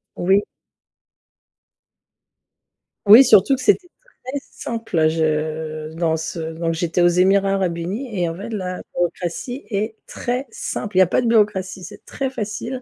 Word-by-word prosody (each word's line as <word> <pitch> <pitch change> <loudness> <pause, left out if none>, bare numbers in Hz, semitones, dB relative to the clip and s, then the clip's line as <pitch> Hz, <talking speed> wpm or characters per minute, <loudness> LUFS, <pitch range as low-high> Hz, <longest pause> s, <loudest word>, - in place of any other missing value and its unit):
Oui. 190 +3 +2 2.6
Oui, 215 +6 +10
surtout 255 +1 +5
que 260 - -7
c'était 370 +2 +2 0.4
très 260 +3 -4
simple. 225 -9 -1
Je 155 0 -2
dans 165 -1 0
ce 160 +1 -5
donc 165 +1 -3
j'étais 170 +1 -1
aux 175 - +6
Émirats 195 +3 +3
arabes 185 -3 0
unis, 200 +10 -4
et 175 - +1
en 165 - -4
fait 200 +6 -7
la 185 -5 -4
bureaucratie 175 +9 -3
est 215 +1 -2
très 250 +3 -3
simple. 210 -2 -4
Il - - +7
y - - +8
a 185 - +5
pas 185 - +1
de 240 - -1
bureaucratie, 205 -4 +1
c'est - - -11
très 270 -1 -3
facile. 240 +2 -5
190 Hz, 155 wpm, -21 LUFS, 165-225 Hz, 2.6 s, Oui